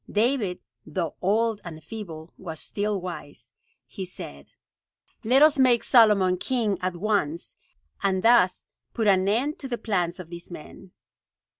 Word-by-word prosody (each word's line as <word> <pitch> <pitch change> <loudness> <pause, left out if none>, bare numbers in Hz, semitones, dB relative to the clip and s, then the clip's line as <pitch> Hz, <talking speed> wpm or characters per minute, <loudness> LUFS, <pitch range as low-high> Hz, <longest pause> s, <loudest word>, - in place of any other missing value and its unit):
David, 215 -4 0 0.2
though 165 +1 -3
old 215 +3 +1
and 160 -3 -9
feeble, 170 -7 -8
was 160 -4 -7
still 205 -1 -2
wise. 145 -9 -9 0.3
He 195 - -7
said: 70 - -9 0.8
"Let 260 +6 +5
us 305 -2 +5
make 250 -3 +4
Solomon 210 -7 +5
king 215 -3 -1
at 185 -1 -2
once, 175 -4 -1 0.5
and 190 -2 0
thus 225 -6 +4 0.3
put 225 - 0
an 190 -2 +4
end 255 +9 0
to 270 - -6
the 240 -2 -3
plans 180 -6 -1
of 175 -2 -9
these 170 0 -9
men." 175 +2 -11
195 Hz, 145 wpm, -25 LUFS, 175-225 Hz, 0.8 s, Let